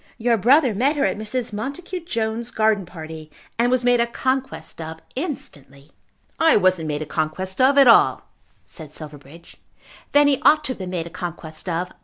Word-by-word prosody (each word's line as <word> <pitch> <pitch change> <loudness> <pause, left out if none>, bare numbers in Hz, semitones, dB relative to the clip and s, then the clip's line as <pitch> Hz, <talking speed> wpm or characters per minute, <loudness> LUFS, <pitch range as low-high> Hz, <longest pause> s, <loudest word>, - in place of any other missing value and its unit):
Your 235 0 +2
brother 250 +4 +4
met 265 +9 +1
her 280 -1 +1
at - - 0
Mrs. 220 +2 -4
Montacute 325 - -5
Jones's 225 -2 -2
garden 215 -5 +1
party, 160 -2 -9 0.3
and 240 +1 +3
was 255 0 +1
made 245 0 +3
a 235 - +2
conquest 260 -5 -3
of 160 0 -7 0.2
instantly." 145 - -7 0.5
"I 325 0 +5
wasn't 185 -5 +2
made 150 0 -2
a - - -8
conquest 160 - -3
of 275 +2 +4
at 275 - +8
all," 230 - +5 0.4
said 155 -3 -10
Silverbridge. 150 +2 -12 0.5
"Then 290 0 +5
he 275 -2 +1
ought 305 0 +5
to 265 - -1
have 250 - -7
been 185 -1 -5
made 175 -3 -3
a 170 - -9
conquest 170 -2 -7
of. 175 +2 -2
215 Hz, 185 wpm, -22 LUFS, 165-260 Hz, 0.5 s, at